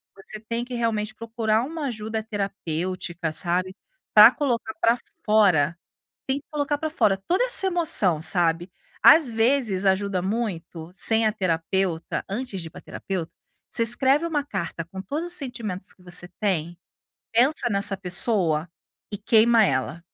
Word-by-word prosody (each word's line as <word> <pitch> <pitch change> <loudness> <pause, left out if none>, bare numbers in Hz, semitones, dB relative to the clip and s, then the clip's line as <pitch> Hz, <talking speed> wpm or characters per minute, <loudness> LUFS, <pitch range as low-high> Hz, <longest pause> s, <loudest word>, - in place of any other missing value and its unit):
você 205 +2 -9
tem 230 +2 -4
que 250 - -9
realmente 220 -2 -1
procurar 225 0 -1
uma 300 +1 -4
ajuda 220 -1 -4
terapêutica, 185 -4 -4
sabe, 180 +3 -1 0.4
para 215 +3 +10
colocar 240 -6 -2
para 230 +1 +3 0.3
fora, 185 -8 +3 0.5
tem 275 +2 0
que - - -34
colocar 290 -1 -1
para 315 0 -3
fora 215 -10 +2
toda 370 +8 +2
essa - - +1
emoção 320 - +3
sabe? 170 0 +1 0.3
Às 295 -4 +7
vezes 225 -4 +1
ajuda 190 -1 +1
muito, 180 -5 -4
sem 225 +3 +1
a 215 - +2
terapeuta, 175 -1 -2
antes 210 -1 -5
de 165 - -8
ir 160 - -9
para - - -12
terapeuta, 180 -4 -5 0.4
você 230 - 0
escreve 270 +7 +3
uma 295 -4 -1
carta 170 - -5
com 190 +3 -9
todos 295 - -4
os 350 - 0
sentimentos 235 - -5
que 185 - -24
você 175 0 -4
tem, 175 -4 -1 0.6
pensa 245 +2 +2
nessa 200 -1 +1
pessoa 180 -3 +1 0.4
e 205 - -4
queima 225 +2 +4
ela. 150 0 -1
210 Hz, 150 wpm, -24 LUFS, 180-240 Hz, 0.6 s, para